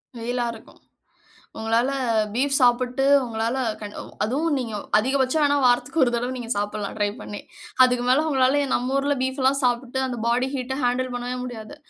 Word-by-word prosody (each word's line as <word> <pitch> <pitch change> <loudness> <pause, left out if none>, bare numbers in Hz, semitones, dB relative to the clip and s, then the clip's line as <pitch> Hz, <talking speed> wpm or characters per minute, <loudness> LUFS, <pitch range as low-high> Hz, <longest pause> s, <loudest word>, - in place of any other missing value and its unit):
வெயிலா 240 +1 -2
இருக்கும். 225 - -15 0.8
உங்களால 225 +3 +1 0.4
பீஃப் 275 +3 +2
சாப்பிட்டு 250 +1 +2 0.2
உங்களால 230 +1 -2 0.2
கண் 210 -1 -8 0.3
அதுவும் 290 +8 0
நீங்க, 235 -4 -4 0.2
அதிகபட்சம் 265 +5 +1
வேன்னா, 285 0 +3
வாரத்துக்கு 250 +5 +2
ஒரு 245 - 0
தடவ 245 +2 -1
நீங்க 240 -2 -7
சாப்புட்லாம். 205 0 -3
ட்ரை 205 -1 +1
பண்ணி 205 - -7 0.4
அதுக்கு 250 -1 +1
மேல 270 +5 +4
உங்களால 270 0 +3
நம்ம 255 +3 0
ஊர்ல 285 +1 0
பீஃப் 260 +1 -2
எல்லாம் 275 +1 +3
சாப்ட்டுட்டு 250 +1 0
அந்த 245 -2 -4
பாடி 245 +2 +1
ஹீட்ட 265 0 -3
ஹேண்டில் 250 +1 0
பண்ணவே 245 +1 -3
முடியாது. 245 +2 -8
250 Hz, 160 wpm, -23 LUFS, 235-265 Hz, 0.8 s, மேல